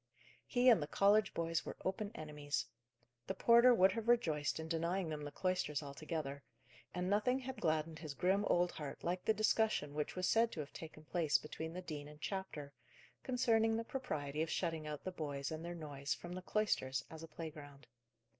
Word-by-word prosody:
He 250 0 +2
and 230 -9 +8
the 145 - -2
college 200 +4 +4
boys 165 -1 -1
were - - -6
open 200 +2 -1
enemies. 150 -2 -3 0.6
The - - -2
porter 235 +2 +7
would 190 -5 +6
have 225 +2 -4
rejoiced 160 -12 +2
in 160 - -4
denying 170 +2 0
them 150 -1 -4
the 145 - -5
cloisters 155 -6 -1
altogether; 140 0 -4 0.5
and 180 0 -2
nothing 210 +6 +3
had 260 -3 -6
gladdened 155 -1 0
his 155 -4 -6
grim 190 +5 +2
old 175 -1 +3
heart 145 -3 -7
like 180 +1 -1
the 220 - +4
discussion 215 -8 +2
which 150 0 -2
was 185 0 0
said 230 +1 +4
to - - -6
have 145 -1 -5
taken 155 -1 -9
place 160 -2 +2
between 160 +2 -6
the 180 +1 -5
dean 150 -4 -5
and 150 0 -12
chapter, 155 -6 -4 0.5
concerning 225 -3 +2
the 230 - -1
propriety 155 - -3
of 160 - 0
shutting 165 -3 -1
out 150 -1 -5
the 185 - -3
boys 145 -5 -3
and 160 +1 -4
their 175 +1 -4
noise 145 -4 -3
from 175 0 -8
the 185 - -5
cloisters, 135 -11 0
as 160 -1 -8
a 165 - -7
playground. 150 -3 -9
165 Hz, 190 wpm, -37 LUFS, 150-200 Hz, 0.6 s, and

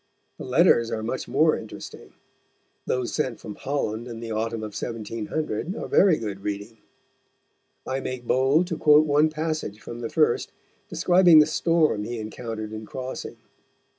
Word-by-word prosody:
The - - -6
letters 115 -1 +4
are 110 -1 -3
much 120 +4 -3
more 155 +4 +3
interesting. 110 - -10 0.7
Those 125 -1 -1
sent 130 -7 -2
from 105 - -8
Holland 120 -3 -3
in 115 -2 -7
the 115 -1 -6
autumn 110 +1 -2
of 105 -1 -6
1700 115 - -4
are - - -5
very 190 -5 +4
good 105 -3 -5
reading. 105 +2 -5 1.1
I 130 +1 -2
make 130 -2 -5
bold 135 +8 +3
to 170 -3 -4
quote 150 0 +6
one 150 +1 +3
passage 155 -9 -3
from 120 +1 -8
the 115 -1 -4
first, 155 -6 +1 0.4
describing 175 -2 +5
the 150 - +8
storm 155 -7 +1
he 120 +3 -5
encountered 110 0 -6
in 110 0 -7
crossing. 130 0 -6
120 Hz, 155 wpm, -25 LUFS, 110-155 Hz, 1.1 s, the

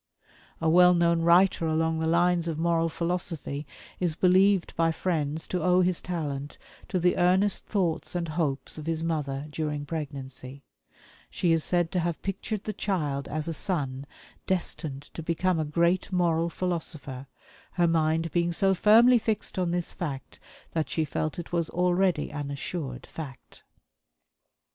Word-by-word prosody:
A 160 - 0
well 180 +2 +6
known 170 -1 +3
writer 170 0 +4
along 160 0 +1
the 160 - 0
lines 170 0 +2
of 160 -2 -2
moral 165 0 +1
philosophy 165 -4 -3 0.3
is 175 -4 0
believed 190 +1 +3
by 165 0 +2
friends 160 -3 -2
to 180 - -1
owe 180 +2 +4
his 180 -1 +1
talent 145 -5 -4 0.3
to 190 - -1
the 180 +1 +2
earnest 185 +3 +2
thoughts 180 -5 -1
and 170 -2 -2
hopes 155 -2 -2
of 155 - -8
his 165 -1 -1
mother 145 -4 -2
during 150 -1 -3
pregnancy 140 -3 -6 0.7
she 175 - 0
is 165 -1 +3
said 175 -2 +1
to 185 - 0
have 170 -1 -1
pictured 195 +2 -3
the 215 - -3
child 150 -9 -2
as 155 +1 -3
a 165 - -2
son 140 -7 -2 0.4
destined 160 -6 -2
to - - -6
become 170 +2 0
a 155 - 0
great 170 +5 +1
moral 170 -2 +1
philosopher, 155 -7 -4 0.5
her 175 -2 +2
mind 165 0 +1
being 175 0 +1
so 195 +2 +3
firmly 230 +6 +6
fixed 215 -3 -2
on 180 -2 +1
this 175 0 -2
fact 140 -6 -6 0.3
that 155 -5 -1
she 160 +3 0
felt 155 +1 -3
it 175 - -7
was 170 -2 0
already 180 -2 +1
an 145 -1 -4
assured 140 -2 -5
fact. 140 -6 -10
165 Hz, 160 wpm, -27 LUFS, 155-180 Hz, 0.7 s, well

